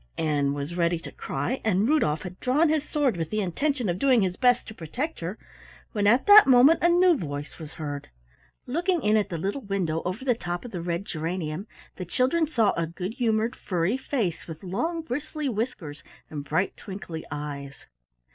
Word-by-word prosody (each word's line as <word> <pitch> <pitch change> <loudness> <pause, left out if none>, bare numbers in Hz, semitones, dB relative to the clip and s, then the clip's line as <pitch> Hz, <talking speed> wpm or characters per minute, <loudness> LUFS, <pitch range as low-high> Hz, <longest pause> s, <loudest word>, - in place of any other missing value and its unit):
Ann 145 -3 +1
was 145 +3 -4
ready 170 -1 +2
to 165 - -9
cry, 260 - -3
and 210 0 +2
Rudolf 205 - +2
had 180 0 -8
drawn 290 +6 +3
his 310 -2 +1
sword 285 -8 +1
with 165 -2 -3
the 215 - -1
intention 250 - -1
of 175 0 -1
doing 255 -4 +4
his 180 -1 -1
best 245 +1 +3
to - - -8
protect 245 - -4
her, 180 +6 -4 0.5
when 205 -3 +1
at 240 +5 +4
that 410 -3 +9
moment 265 +5 +7
a 345 - +4
new 355 0 +5
voice 145 - -6
was 160 -1 -9
heard. 145 -2 -5 0.6
Looking 340 +5 0
in 210 +1 +3
at 210 -2 +1
the 170 - -3
little 200 - -2
window 185 -7 -1
over 185 +9 -4
the 250 - +4
top 175 -3 -5
of 245 - -8
the 175 - -4
red 170 +2 -2
geranium 165 +2 -4 0.3
the 180 - -5
children 260 - +1
saw 230 -9 +2
a 165 -1 -1
good 180 +5 -5
humored 230 -1 0
furry 180 +4 -1
face 240 - -2
with 160 +1 -9
long 325 - -2
bristly 300 +1 -4
whiskers 210 - -3 0.3
and 145 -2 -5
bright 160 +6 0
twinkly 185 -5 -7
eyes. 145 -1 -6
200 Hz, 195 wpm, -26 LUFS, 165-260 Hz, 0.6 s, that